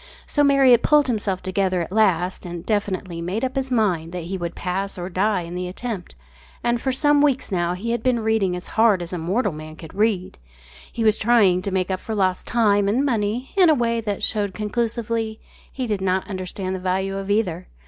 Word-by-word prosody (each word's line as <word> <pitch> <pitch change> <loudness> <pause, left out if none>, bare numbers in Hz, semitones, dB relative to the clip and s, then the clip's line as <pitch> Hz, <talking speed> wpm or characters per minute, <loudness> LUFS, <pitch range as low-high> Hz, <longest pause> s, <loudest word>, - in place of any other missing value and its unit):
So 290 - +1
Marriott 270 -4 +5
pulled 300 -1 +4
himself 210 -6 -1
together 185 -1 0
at 165 - -9
last 190 -4 +1
and 175 0 -7
definitely 195 -5 -2
made 185 +7 -3
up 260 +1 -2
his 270 -1 -1
mind 180 -9 0
that 180 -2 -4
he 180 +4 -4
would 175 -2 -4
pass 195 +2 -3
or 180 0 -4
die 195 +1 +1
in 170 +1 -8
the 180 0 -3
attempt, 195 0 -6 0.5
and 235 0 +1
for 265 - 0
some 290 +2 +3
weeks 275 -6 +1
now 175 -1 0
he 225 +6 -3
had 235 - -1
been 245 -1 +1
reading 220 -5 +1
as 180 - -7
hard 220 -5 +3
as 175 - -7
mortal 185 +6 0
man 155 0 -9
can 160 -1 -11
read. 200 - 0 0.5
He 230 - -3
was 215 -1 +3
trying 205 -6 +4
to 200 - -3
make 185 -1 -1
up 185 - -1
for 220 - -5
lost 185 -2 0
time 205 -4 +3
and 245 +8 +2
money 235 0 -1
in 370 -4 +6
a 310 - +5
way 235 -2 0
that 205 -3 -3
showed 205 -3 -1
conclusively 225 0 -2 0.3
he 260 - -3
did 210 -4 -2
not 190 0 0
understand 185 -1 -4
the 190 - -3
value 190 +1 -1
of 195 0 -5
either. 185 -4 0
205 Hz, 210 wpm, -22 LUFS, 185-230 Hz, 0.5 s, in